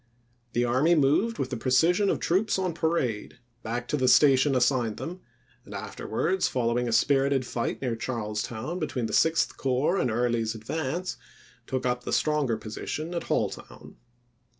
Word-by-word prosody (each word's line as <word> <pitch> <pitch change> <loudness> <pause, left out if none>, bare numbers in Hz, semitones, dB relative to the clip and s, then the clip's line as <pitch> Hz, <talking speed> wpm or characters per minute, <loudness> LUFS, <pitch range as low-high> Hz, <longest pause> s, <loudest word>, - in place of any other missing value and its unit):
The 120 +1 +2
army 135 +8 +3
moved 160 +11 +2
with 130 0 -3
the 125 - -2
pre 130 - -3
cision 175 +9 +4
of - - 0
troops 195 +5 +1
on 185 -2 -1
parade 160 -12 -1 0.2
back 120 +2 -4
to 150 - 0
the 130 -2 +1
station 135 +1 +5
assigned 125 -3 +1
them, 175 +3 -6 0.4
and - - -10
afterwards, 380 - -1
following 120 -1 0
a - - -1
spirited 135 +2 +2
fight 120 +2 -3
near 120 -3 -1
Charlestown 115 +6 -4
between 135 -7 -2
the - - -4
Sixth 160 0 +2
Corps 135 +7 +1
and - - +1
Early's 115 -1 0
advance, 160 +10 -3 0.5
took 130 -1 -2
up 125 0 -1
the - - -4
stronger 150 -7 +1
position 150 +10 -5
at 170 - -3
Halltown. - - -4
130 Hz, 160 wpm, -27 LUFS, 120-160 Hz, 0.5 s, station